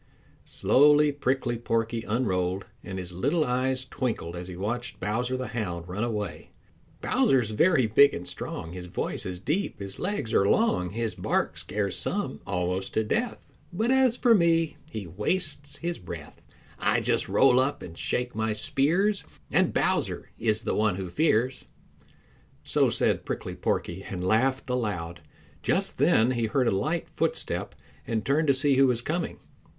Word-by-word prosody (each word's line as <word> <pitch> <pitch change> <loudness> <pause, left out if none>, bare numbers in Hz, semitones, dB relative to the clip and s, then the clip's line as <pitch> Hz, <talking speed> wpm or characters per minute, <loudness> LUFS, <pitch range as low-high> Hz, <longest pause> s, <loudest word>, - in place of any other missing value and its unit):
Slowly 150 +2 +4
Prickly 130 -4 -1
Porky 115 0 -1
unrolled, 95 -5 -1 0.2
and 95 -1 -6
his 90 -1 -5
little 140 - +1
eyes 130 +1 0
twinkled 115 -11 -3
as 90 +1 -6
he 90 - -7
watched 120 +6 -3
Bowser 120 +6 -1
the 130 -3 -4
Hound 90 -8 -4
run 95 +5 -3
away. 105 -5 -4 0.5
"Bowser's 125 -5 +2
very 135 +4 +4
big 140 +6 +6
and 90 +1 -6
strong; 80 -1 -5
His 90 0 -7
voice 90 - -3
is 90 -1 -4
deep; 150 - -2
his 100 -1 -6
legs 185 - -2
are 100 - +4
long; 155 - +2
His 115 +2 -2
bark - - -1
scares 100 -2 -2
some 75 - -2
almost 90 +1 -2
to 110 - +3
death. 235 - -2 0.3
But 220 +8 0
as 260 -2 +4
for 240 -2 +5
me 165 -4 +3
he 110 -8 -5
wastes 140 - -1
his 170 0 -3
breath; 90 - -9 0.4
I - - +2
just - - 0
roll 130 -2 +5
up 135 +2 0
and 85 - -9
shake 125 +7 -2
my 110 0 0
spears 170 - +1 0.3
And - - +3
Bowser - - 0
is 110 -1 +1
the - - -1
one 105 -3 +2
who 95 -2 -5
fears." 130 - +1 1.0
So - - +2
said - - +1
Prickly - - -4
Porky, 85 +2 -2
and 95 -2 -5
laughed 130 +7 +2
aloud. 100 - -2 0.4
Just - - 0
then 115 +3 +4
he 120 -2 0
heard 125 +2 +1
a - - +3
light 155 - -1
footstep - - -1 0.3
and 110 -2 -1
turned 150 +3 +2
to 140 - +4
see 135 0 +3
who 135 0 +6
was 120 -2 0
coming. 170 +4 -2
120 Hz, 165 wpm, -27 LUFS, 100-140 Hz, 1.0 s, big